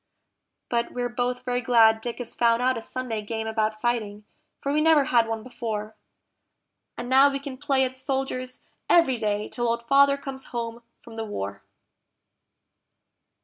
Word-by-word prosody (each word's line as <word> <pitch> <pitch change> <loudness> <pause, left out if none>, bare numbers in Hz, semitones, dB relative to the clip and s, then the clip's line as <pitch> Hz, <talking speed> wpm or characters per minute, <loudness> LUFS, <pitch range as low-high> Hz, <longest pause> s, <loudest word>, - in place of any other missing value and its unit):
But 235 -1 -1
we're 245 -1 -2
both 250 +1 -2
very 245 -1 0
glad 225 -2 +5
Dick 240 0 -4
has 245 - -5
found 230 -1 +3
out 255 +1 +2
a 230 - -4
Sunday 235 -2 -4
game 220 +1 -4
about 220 -1 -1
fighting, 215 -3 -2 0.3
for 280 - -2
we 305 - +2
never 315 -2 +5
had 235 -3 +3
one 225 -1 -3
before; 220 -4 -5 1.0
And 245 - -5
now 265 +2 +6
we 275 - -2
can 280 -1 -7
play 275 -1 +1
at 260 0 -3
soldiers 260 -1 -3 0.3
every 335 -8 +5
day 210 -1 -1
till 240 -1 -2
Old 235 0 -1
Father 280 +3 +5
comes 270 -1 -7
home 235 -1 -5 0.2
from 225 -1 -12
the 225 - -2
war. 100 - -5
240 Hz, 165 wpm, -25 LUFS, 225-260 Hz, 1.0 s, now